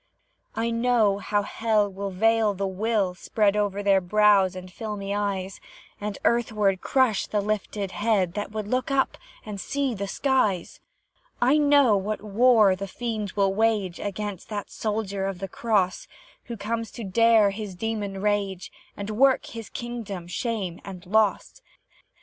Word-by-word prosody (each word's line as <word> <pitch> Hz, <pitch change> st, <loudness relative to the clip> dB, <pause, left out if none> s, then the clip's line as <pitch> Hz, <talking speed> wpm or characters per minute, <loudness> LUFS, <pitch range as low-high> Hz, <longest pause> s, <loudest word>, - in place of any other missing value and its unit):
I 230 Hz, +1 st, -1 dB
know 230 Hz, -4 st, +2 dB
how 205 Hz, 0 st, 0 dB
Hell 210 Hz, -1 st, 0 dB
the 195 Hz, +1 st, -4 dB
veil 220 Hz, +2 st, +2 dB
will 195 Hz, 0 st, 0 dB
spread 205 Hz, +2 st, +1 dB
Over 205 Hz, -1 st, -1 dB
their 195 Hz, -1 st, +4 dB
brows 195 Hz, 0 st, +4 dB
and 185 Hz, 0 st, -9 dB
filmy 205 Hz, -2 st, -4 dB
eyes, 195 Hz, -2 st, -2 dB, 0.4 s
And 205 Hz, 0 st, -4 dB
earthward 210 Hz, -5 st, +1 dB
crush 260 Hz, -6 st, +2 dB
the 210 Hz, -, 0 dB
lifted 205 Hz, -1 st, -2 dB
head 205 Hz, -5 st, +1 dB
That 205 Hz, 0 st, -4 dB
would 215 Hz, -1 st, -4 dB
look 255 Hz, +4 st, -1 dB
up 275 Hz, -1 st, +1 dB, 0.3 s
and 205 Hz, -2 st, -6 dB
seek 275 Hz, -4 st, -2 dB
the 200 Hz, -, -2 dB
skies; 215 Hz, -7 st, 0 dB, 0.6 s
I 265 Hz, +5 st, +4 dB
know 285 Hz, -6 st, +5 dB
what 210 Hz, +2 st, -3 dB
war 215 Hz, -2 st, +4 dB
the 195 Hz, +1 st, -5 dB
fiend 215 Hz, -2 st, -4 dB
will 195 Hz, -2 st, +2 dB
wage 210 Hz, -4 st, +1 dB
Against 205 Hz, -1 st, -5 dB
that 205 Hz, -2 st, -5 dB
soldier 205 Hz, -3 st, -2 dB
of 195 Hz, -2 st, -4 dB
the 195 Hz, +2 st, -5 dB
Cross, 195 Hz, -2 st, 0 dB, 0.4 s
Who 235 Hz, -1 st, -6 dB
comes 225 Hz, +2 st, -3 dB
to 235 Hz, -, -7 dB
dare 220 Hz, +1 st, +4 dB
his 200 Hz, -2 st, -6 dB
demon 205 Hz, -1 st, -3 dB
rage, 200 Hz, -3 st, -1 dB, 0.3 s
And 200 Hz, +1 st, -4 dB
work 260 Hz, +5 st, +3 dB
his 225 Hz, -2 st, -8 dB
kingdom 230 Hz, -7 st, -6 dB
shame 190 Hz, -1 st, -3 dB
and 185 Hz, -3 st, -9 dB
loss. 215 Hz, -, +1 dB
210 Hz, 150 wpm, -25 LUFS, 195-225 Hz, 0.6 s, know